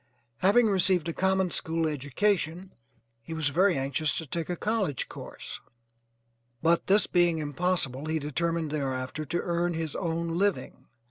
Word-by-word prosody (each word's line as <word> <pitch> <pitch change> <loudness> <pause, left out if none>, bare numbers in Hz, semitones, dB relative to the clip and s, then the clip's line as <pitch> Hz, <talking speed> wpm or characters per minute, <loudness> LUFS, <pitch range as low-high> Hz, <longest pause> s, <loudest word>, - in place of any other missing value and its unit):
Having 205 +6 +5
received 185 -4 +3
a - - -2
common 190 0 +1
school 165 0 0
education 165 +5 -1 0.5
he 160 +8 -7
was 155 -3 +1
very 180 +4 +3
anxious 140 +3 0
to 160 - -3
take 165 +3 -4
a 180 - -1
college 200 - -1
course, - - -8 1.0
but 170 +1 +3
this 200 +2 +5
being 175 -2 +2
impossible, 150 -2 -1
he 160 0 0
determined 160 +1 -1
thereafter 135 0 -3
to 170 +5 -1
earn 175 0 0
his 160 -2 -3
own 170 -1 -2
living. 200 -1 -1
165 Hz, 145 wpm, -28 LUFS, 150-185 Hz, 1.0 s, Having